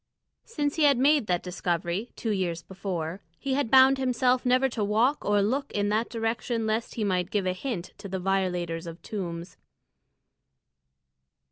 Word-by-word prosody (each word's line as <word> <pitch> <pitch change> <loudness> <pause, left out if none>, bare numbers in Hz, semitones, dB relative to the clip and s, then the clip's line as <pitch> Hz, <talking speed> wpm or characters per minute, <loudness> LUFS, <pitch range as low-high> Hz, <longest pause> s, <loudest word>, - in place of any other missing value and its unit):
Since 295 -9 -2
he 310 - +4
had 280 -3 +5
made 280 -2 +3
that 175 -1 0
discovery, 180 +3 -2
two 225 - -2
years 175 -4 -1
before, 185 -2 -4 0.2
he 270 +7 -2
had 275 -3 0
bound 265 +1 +6
himself 255 0 +1
never 255 +2 +4
to 235 -4 -3
walk 225 +8 +2
or 205 -1 +2
look 270 +7 -1
in 205 0 0
that 220 +3 0
direction 225 0 -2
lest 220 +1 -2
he 225 - -1
might 180 -3 0
give 205 -3 0
a 185 - +1
hint 185 -3 -5
to 200 -1 -8
the 190 - -2
violators 180 -3 -1
of 165 +1 -8
tombs. 175 -4 -5
210 Hz, 165 wpm, -27 LUFS, 180-255 Hz, 0.2 s, bound